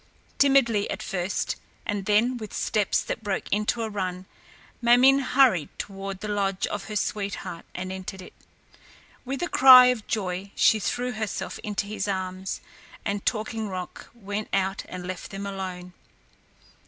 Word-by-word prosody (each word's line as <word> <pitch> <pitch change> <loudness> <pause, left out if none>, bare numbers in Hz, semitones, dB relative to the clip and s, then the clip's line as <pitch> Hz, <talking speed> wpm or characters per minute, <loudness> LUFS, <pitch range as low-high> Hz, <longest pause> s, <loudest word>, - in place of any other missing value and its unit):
Timidly 250 -7 +4
at - - -4
first, 185 -1 -2 0.3
and 205 -2 -3
then 230 +5 +3
with 215 -3 -7
steps 210 -3 +1
that - - -5
broke 200 -2 -2
into 210 +3 +1
a - - -1
run, 185 -2 -3 0.6
Ma 235 0 +5
min´ 270 +3 +6
hurried 255 - +3
toward 195 -1 -6
the 210 - -4
lodge 200 -2 0
of 205 -1 -4
her 215 - -6
sweetheart 195 -4 -3
and 185 +1 -4
entered 190 +1 -6
it. - - -13 0.9
With 270 +5 -3
a - - 0
cry 255 -4 +9
of 225 -4 -10
joy 195 -2 -2
she 220 - +4
threw 245 +5 -1
herself 220 -3 -4
into 205 -1 -3
his 205 -1 -3
arms, 185 -1 -3 0.4
and 200 -1 -2
Talking 220 -1 -1
Rock 185 -1 -7
went 205 -1 -4
out 195 0 0
and 180 -1 -6
left 185 -1 -6
them 195 +1 -6
alone. 185 -2 -6
205 Hz, 155 wpm, -26 LUFS, 190-220 Hz, 0.9 s, cry